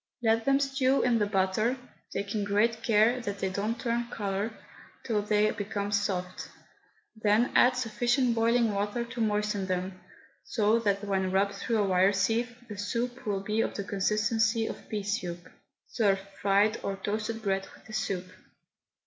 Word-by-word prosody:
Let 225 0 +2
them 275 0 +4
stew 270 -1 +2
in 240 -2 +3
the 210 - +1
butter 205 +5 +1 0.3
(taking 200 +1 -2
great 215 +3 +1
care 230 +3 +3
that 200 -3 -4
they 195 -1 -1
don't 210 +5 -2
turn 235 -1 -1
colour) 200 0 -2 0.5
till 215 -4 0
they 210 0 +2
become 205 0 -3
soft, 190 -3 -2 0.7
then 220 +2 +2
add 250 0 +5
sufficient 240 +1 +1
boiling 230 0 +2
milk 205 +2 -2 0.2
to 250 -2 -4
moisten 210 -2 0
them, 185 0 -3 0.4
so 220 +1 +2
that 200 -2 0
when 190 -2 0
rubbed 195 +1 +1
through 225 +3 -1
a 210 - +3
wire 190 +2 +4
sieve 230 +5 0
the 210 -3 -8
soup 235 +4 -3
will 200 -2 0
be 215 +3 0
of - - -2
the 200 - -3
consistency 220 +3 +1
of - - -7
pea 210 -2 -2
soup. 180 -4 -3 0.4
Serve 200 -4 +2 0.2
fried 205 +2 +3
or 195 - -2
toasted 215 +3 -3
bread 195 -1 0
with - - -20
the 220 - -11
soup. 190 -4 -2
210 Hz, 165 wpm, -29 LUFS, 200-230 Hz, 0.7 s, add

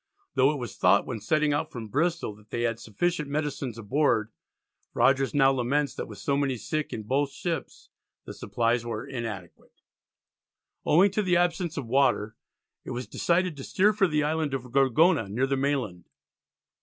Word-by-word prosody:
Though 135 +3 +4
it 150 - -3
was 120 -6 -6
thought 100 +2 +4
when 120 -4 -4
setting 150 +7 +1
out 155 +2 -2
from 115 -3 -7
Bristol 160 0 -1
that 105 0 -21
they 120 - -2
had 115 -1 -1
sufficient 150 - -2
medicines 140 -5 -3
aboard, 115 -1 +1 0.6
Rogers 135 +2 +3
now 135 -1 +5
laments 135 +3 0
that - - -5
with - - -10
so 140 - -1
many 140 -2 0
sick 155 +6 -3
in 110 - -5
both 135 +5 0
ships 165 +4 -5 0.4
the - - -7
supplies 120 0 0
were 115 -2 -4
inadequate. 110 -9 -7 1.1
Owing 185 +6 +5
to 210 - 0
the 180 -3 +2
absence 175 -1 0
of 140 - -3
water 115 -4 +1 0.5
it - - -9
was 125 +1 -4
decided 175 -1 0
to 135 - -7
steer 205 +8 +2
for 200 -2 +3
the 150 -2 +1
island 155 -2 0
of 125 -2 -6
Gorgona, 135 - +3
near 120 +7 0
the 135 0 0
mainland. 135 - -2
135 Hz, 175 wpm, -27 LUFS, 115-155 Hz, 1.1 s, now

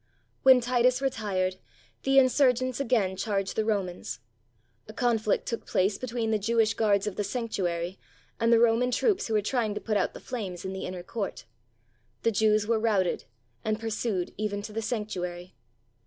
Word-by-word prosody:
When 260 -1 +7
Titus 250 +1 +2
retired, 200 -8 -1 0.4
the 270 0 +2
insurgents 255 -1 +4
again 225 -8 +1
charged 195 -1 -2
the 220 - +1
Romans. 185 - -2 0.7
A 215 - -9
conflict 225 -3 +1
took 230 - -4
place 195 +2 +1
between 235 -3 -2
the 215 - +2
Jewish 225 +1 +2
guards 205 -3 +2
of 210 -3 -4
the 205 - 0
sanctuary 190 -5 -2 0.4
and 230 0 +3
the 230 - +7
Roman 235 +2 +3
troops 390 - +1
who 225 - -1
were 210 - +2
trying 220 -2 0
to - - -2
put 215 -2 -1
out - - -1
the - - -7
flames 195 -9 -5
in 190 - -3
the 190 - -4
inner 180 -1 -6
court. 200 - -5 0.8
The 230 - +3
Jews 215 0 +3
were 225 0 +1
routed, 205 -5 +1 0.4
and 215 0 -1
pursued 220 -4 -2
even 205 -1 -2
to 210 - -7
the 225 - -2
sanctuary. 185 -6 -4
215 Hz, 170 wpm, -28 LUFS, 195-235 Hz, 0.8 s, When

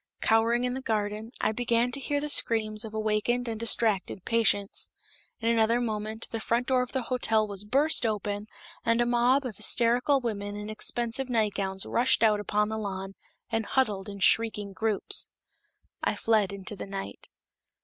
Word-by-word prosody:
Cowering 230 +2 +2
in 250 0 -1
the 265 - -5
garden, 215 -1 -3
I 215 - +2
began 240 +1 0
to 275 - -4
hear 285 +2 -1
the 295 - -4
screams 215 -6 +3
of 220 -1 -8
awakened 220 +3 0
and 225 -2 -4
distracted 220 -5 +2
patients. 220 -3 +2 0.5
In 230 - -3
another 230 0 +3
moment, 220 -1 -4
the 225 - -3
front 235 +2 0
door 255 -1 +2
of 250 - -4
the 260 -2 -2
hotel 225 -3 0
was 200 -1 -4
burst 280 +8 +3
open, 210 -1 -2 0.4
and 230 0 +2
a 240 - +3
mob 245 +3 +2
of 220 -6 -6
hysterical 245 +4 +3
women 205 -4 -4
in 210 +1 -6
expensive 240 +4 -1
nightgowns 200 -4 -1
rushed 240 -1 +2
out 215 -2 +4
upon 210 0 0
the 220 0 -3
lawn, 195 -2 -5 0.4
and 225 0 0
huddled 210 -5 -1
in 200 - -8
shrieking 210 -1 +2
groups. 215 0 +1 0.8
I - - 0
fled 215 -4 +1
into 200 +1 -7
the 200 - -7
night. 195 0 -7
225 Hz, 170 wpm, -27 LUFS, 210-240 Hz, 0.8 s, out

